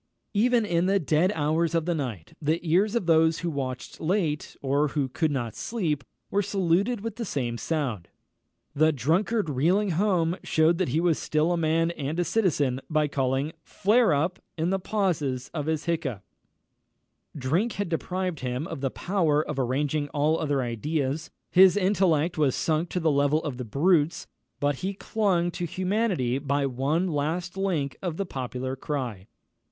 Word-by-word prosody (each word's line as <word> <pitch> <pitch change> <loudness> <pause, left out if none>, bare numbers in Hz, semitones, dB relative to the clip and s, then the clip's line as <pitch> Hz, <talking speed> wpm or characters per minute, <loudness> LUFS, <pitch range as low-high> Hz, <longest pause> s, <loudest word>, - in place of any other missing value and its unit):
Even 235 +2 +3
in 175 -2 +1
the 195 +1 +3
dead 165 +2 +2
hours 160 +2 +1
of 165 -1 +1
the 175 - +1
night, 120 - -5
the 155 +3 +1
ears 195 +7 +3
of 235 - 0
those 160 -1 +3
who 170 - 0
watched 130 -4 -5
late, 160 -3 -1
or 140 +2 +1
who 145 -1 -1
could 155 +5 0
not 120 -6 -2
sleep, 165 -12 -2 0.3
were 200 - +2
saluted 200 +3 +1
with 225 0 -5
the 240 - -3
same 125 - -2
sound. 125 - -2 0.7
The 155 +2 +4
drunkard 170 - +1
reeling 175 +9 +2
home 175 -1 +1
shewed 160 +2 +3
that 185 - +1
he 150 +6 +1
was 170 -2 +2
still 155 +2 +1
a - - +2
man 165 0 +1
and 155 0 -4
a - - +3
citizen, 145 - +1
by 155 -2 +2
calling 135 +1 0
"flare 215 +4 +2
up!" 160 +5 0 0.2
in 165 +3 0
the 195 - +1
pauses 160 -11 -1
of 150 -3 -3
his 160 -1 -1
hiccough. 135 - -2 1.1
Drink 165 - 0
had 200 -1 -2
deprived 180 0 -2
him 125 +3 -3
of 135 - -6
the 135 - 0
power 160 -3 0
of 150 -2 -3
arranging 145 +3 0
all 150 +3 +1
other 145 -4 0
ideas; 140 +5 -2 0.2
his 185 0 +7
intellect 180 -5 +2
was 140 -4 +3
sunk 160 +1 0
to 180 - -2
the 160 -2 +2
level 145 +2 +2
of 140 -5 -4
the 125 - -5
brute's; 155 - +2 0.3
but 145 -1 +1
he 195 +6 -3
clung 185 -5 0
to 175 0 -3
humanity 185 - 0
by 140 0 0
the 135 - +1
one 145 +8 0
last 165 +4 -2
link 170 -9 -1
of 175 -4 -3
the 195 - -1
popular 130 -3 -4
cry. 125 -9 -4
160 Hz, 175 wpm, -26 LUFS, 140-180 Hz, 1.1 s, his